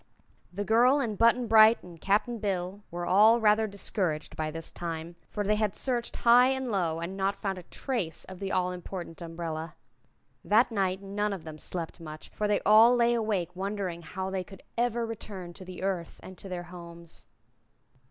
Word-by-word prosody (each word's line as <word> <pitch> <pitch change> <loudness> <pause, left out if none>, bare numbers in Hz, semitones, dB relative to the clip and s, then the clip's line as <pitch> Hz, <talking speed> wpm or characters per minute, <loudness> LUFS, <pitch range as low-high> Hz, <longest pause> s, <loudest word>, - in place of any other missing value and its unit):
The 200 +3 -3
girl 245 +6 +5
and 230 -6 -1
Button 235 +3 +4
Bright 220 0 +6
and 170 -3 -13
Cap'n 215 +4 +1
Bill 195 -1 -2
were 175 +1 -4
all 215 +6 +6
rather 215 0 +3
discouraged 190 -5 -3
by 155 0 -2
this 165 +1 -6
time, 165 0 -5
for 205 - -3
they 210 +1 +1
had 215 -2 0
searched 245 -3 -2
high 245 +2 +6
and 265 -2 -1
low 170 -5 0
and 170 +2 -4
had 195 - -8
not 195 +1 0
found 195 -1 -3
a 175 - -15
trace 230 - -3
of 185 -1 -10
the 195 -1 -3
all 180 0 +1
important 180 -1 -7
umbrella. 165 -1 -5 0.7
That 225 +4 +4
night 190 -2 -1
none 205 +1 -1
of 185 -5 -7
them 155 -1 -9
slept 170 +1 -5
much, 155 -1 -9
for 210 - -2
they 205 -1 +1
all 220 +4 +7
lay 240 0 +3
awake 205 -7 -1
wondering 190 -2 -3
how 190 +3 -5
they 190 -1 -2
could 195 +1 -14
ever 235 0 0
return 200 -5 -7
to 190 - -11
the 185 0 -8
Earth 185 -4 -3
and 185 - -10
to 195 - -9
their 180 -1 -4
homes. 170 -1 -11
195 Hz, 190 wpm, -29 LUFS, 175-220 Hz, 0.7 s, all